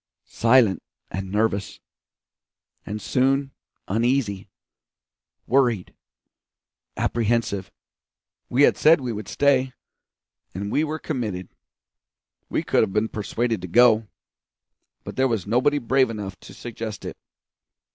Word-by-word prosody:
Silent 115 -4 +4 0.3
and 95 +1 -5
nervous. 105 -1 -1 1.1
And 105 +2 -4
soon 135 +4 +1 0.4
uneasy 110 -2 0 1.0
worried 120 -7 +1 1.0
apprehensive. 115 -4 0 0.8
We 130 +4 +3
had - - +5
said 160 +1 +6
we 125 -3 -3
would 105 0 -6
stay, 135 -2 +2 0.8
and 100 +2 -4
we 150 - +2
were 155 0 -2
committed. 110 - -4 1.0
We - - -1
could - - +2
have 95 - 0
been 110 +1 +1
persuaded 115 0 -2
to 90 - -6
go, 115 +2 +5 1.0
but - - -8
there 130 0 +3
was 115 -7 -1
nobody 125 +7 +2
brave 130 -1 +2
enough 105 -4 -5
to 95 - -13
suggest 115 -2 -7
it. - - -6
115 Hz, 115 wpm, -24 LUFS, 105-130 Hz, 1.1 s, said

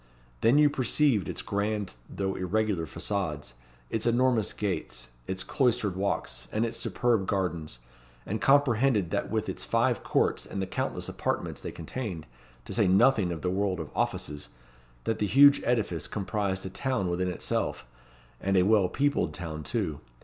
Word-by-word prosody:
Then 120 +5 +4
you 150 0 +7
perceived 130 - +2
its - - -4
grand 100 -1 -1 0.2
though 95 -1 -2
irregular 95 -2 0
facades, 75 -8 -3 0.4
its 110 +1 -1
enormous 120 -2 +3
gates, 75 -12 -3 0.2
its 95 0 -2
cloistered 120 -7 +1
walks, 100 +1 -2
and 110 +2 +1
its 115 - -4
superb 115 -6 +1
gardens; 85 -9 -2 0.5
and 110 +3 -3
comprehended 130 - +3
that - - -1
with - - -1
its - - -4
five - - +1
courts - - +1
and 100 - -5
the 95 - 0
countless - - -3
apartments - - -2
they - - -5
contained, 85 -2 -5 0.4
to - - -6
say - - +3
nothing 95 0 +4
of 80 -3 -5
the 90 - +1
world 95 -1 0
of 80 - -6
offices, 75 -4 -2 0.5
that 110 -1 -1
the 105 - +1
huge 140 +6 +7
edifice 105 -10 0
comprised 100 -2 -2
a 95 - -5
town 130 -4 -1
within 90 +1 0
itself 90 - -2 0.5
and 95 0 +1
a 90 - +5
well 100 -2 +4
peopled 145 +7 0
town 80 -3 -5
too. 75 0 -2
100 Hz, 160 wpm, -28 LUFS, 90-115 Hz, 0.5 s, you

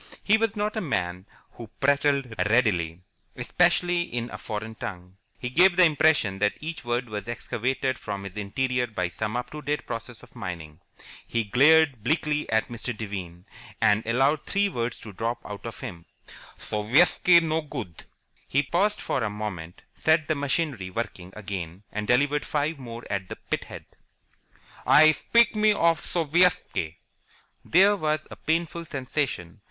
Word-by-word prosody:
He 210 - +5
was 225 -1 0
not 210 +1 -1
a 220 - -1
man 90 - -2 0.2
who 115 -3 -11
prattled 140 -2 +2 0.2
readily, 90 -8 +1 0.3
especially 175 +6 +2
in 120 -7 -4
a - - -6
foreign 110 +1 -5
tongue. 90 -3 -8 0.2
He 125 - -5
gave 175 +5 +5
the 180 -1 +7
impression 145 - +2
that 105 0 +1
each 160 -2 -6
word 120 +1 -1
was 105 -3 -6
excavated 130 +2 -2
from 100 -1 -5
his 100 0 -8
interior 125 +4 -1
by 90 -6 -2
some 110 +6 -3
up 125 - -5
to 150 - -7
date 150 0 -2
process 115 0 -6
of - - -17
mining. 80 -4 -7 0.5
He 115 -1 0
glared 140 +2 +4
bleakly 150 0 0
at 110 0 +1
Mr. 120 -1 -5
Devine, 95 -5 -6 0.3
and 110 -1 +3
allowed 135 +6 +2
three 200 0 0
words 120 -7 -3
to 105 - -9
drop 115 +4 -2
out 105 +2 -7
of 115 - -8
him. 90 -10 -8 0.5
"Sovietski 145 +11 +4
no 160 0 0
good!" 125 - -8 0.4
He 140 +2 +2
paused 190 +9 +1
for 130 - -1
a 110 - 0
moment, 100 -5 -6
set 160 -1 +2
the 155 - +2
machinery 140 - -1
working 95 -3 -5
again, 95 -3 -6
and 105 0 -4
delivered 145 +5 +2
five 150 0 -1
more 120 -2 -8
at 95 -2 -3
the - - -5 0.2
pithead. - - -4 1.0
"I 155 +1 +7
spit 235 +10 +3
me 215 0 +4
of 165 -4 +2
Sovietski!" 165 - +1 0.7
There 195 +4 +5
was 155 -4 -1
a - - -7
painful 170 +1 -2
sensation. 130 - -3
125 Hz, 160 wpm, -26 LUFS, 105-155 Hz, 1.0 s, the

